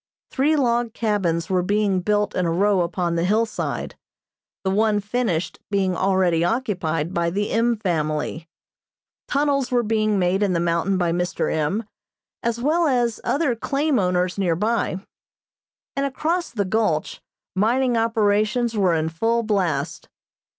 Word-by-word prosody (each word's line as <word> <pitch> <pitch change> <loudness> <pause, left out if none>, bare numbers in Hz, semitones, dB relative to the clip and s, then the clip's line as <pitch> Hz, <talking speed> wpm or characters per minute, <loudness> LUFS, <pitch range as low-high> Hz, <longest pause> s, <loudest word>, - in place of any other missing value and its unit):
Three 290 +4 +2
log 240 -4 +1
cabins 185 -7 0
were 185 -2 +1
being 200 0 +1
built 210 +2 0
in 180 -2 +1
a - - 0
row 195 +2 +2
upon 170 0 -1
the 170 0 0
hillside, 220 +4 -1 0.7
the 190 - 0
one 210 +1 +2
finished 205 -5 -2
being 195 -2 +1
already 185 -3 +2
occupied 175 - -1
by 170 0 +1
the 205 +4 -2
M. 235 +1 +2
family. 160 -4 -2 0.8
Tunnels 280 -2 +1
were 245 -1 +2
being 215 -1 +1
made 185 +1 +1
in 200 -3 +2
the 170 - +1
mountain 170 +3 +1
by 175 -2 +1
Mr. 175 +1 -1
M., 160 +8 0 0.6
as 235 0 -1
well 315 +6 +2
as 240 -4 0
other 280 -4 +1
claim 275 +3 0
owners 180 0 0
near 175 -4 +1
by, 210 -1 -1 0.9
and 275 - 0
across 330 +6 -1
the 205 -4 -2
gulch 220 +4 -1 0.3
mining 240 +5 +2
operations 225 +1 +1
were 185 -5 +2
in 160 0 0
full 225 +9 0
blast. 170 -8 -1
205 Hz, 145 wpm, -22 LUFS, 180-235 Hz, 0.9 s, Three